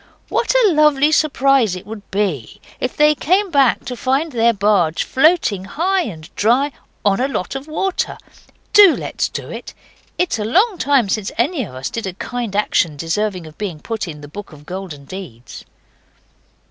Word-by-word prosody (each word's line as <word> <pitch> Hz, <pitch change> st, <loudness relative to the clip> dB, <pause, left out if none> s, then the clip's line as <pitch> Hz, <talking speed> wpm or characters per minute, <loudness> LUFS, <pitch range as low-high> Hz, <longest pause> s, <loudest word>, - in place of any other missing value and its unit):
What -, -, +1 dB
a 405 Hz, -, +5 dB
lovely 300 Hz, -1 st, +4 dB
surprise 275 Hz, -, +3 dB
it 180 Hz, -, -9 dB
would 210 Hz, -1 st, -9 dB
be 190 Hz, -, -2 dB, 0.2 s
if 255 Hz, -, -3 dB
they 300 Hz, 0 st, +5 dB
came 370 Hz, +7 st, +1 dB
back 275 Hz, -5 st, +3 dB
to 250 Hz, -, -4 dB
find 270 Hz, +6 st, 0 dB
their 235 Hz, -2 st, +3 dB
barge 200 Hz, -6 st, +2 dB
floating 265 Hz, -, +2 dB
high 370 Hz, -, 0 dB
and 160 Hz, -5 st, -8 dB
dry 250 Hz, +7 st, +2 dB, 0.3 s
on 200 Hz, 0 st, +3 dB
a 260 Hz, -, +1 dB
lot 185 Hz, -10 st, -3 dB
of 270 Hz, +2 st, -6 dB
water! 360 Hz, +5 st, -2 dB, 0.6 s
DO 410 Hz, -5 st, +8 dB
let's -, -, -2 dB
do -, -, -6 dB
it. -, -, -8 dB, 0.4 s
It's 360 Hz, -10 st, 0 dB
a -, -, -1 dB
long 380 Hz, -, +2 dB
time 270 Hz, -5 st, +3 dB
since 200 Hz, +1 st, -2 dB
any 265 Hz, +5 st, +1 dB
of 130 Hz, -, -12 dB
us 130 Hz, +1 st, -4 dB
did 225 Hz, -4 st, -4 dB
a 185 Hz, -, -4 dB
kind 235 Hz, +1 st, -5 dB
action 170 Hz, -7 st, +1 dB
deserving 180 Hz, +3 st, -2 dB
of 155 Hz, 0 st, -14 dB
being 190 Hz, -7 st, -4 dB
put 220 Hz, +2 st, -4 dB
in 150 Hz, -3 st, -8 dB
the 145 Hz, -, -9 dB
Book 200 Hz, +6 st, -9 dB
of 150 Hz, -1 st, -14 dB
Golden 175 Hz, -5 st, -7 dB
Deeds. 140 Hz, -9 st, -10 dB
225 Hz, 180 wpm, -19 LUFS, 185-285 Hz, 0.6 s, DO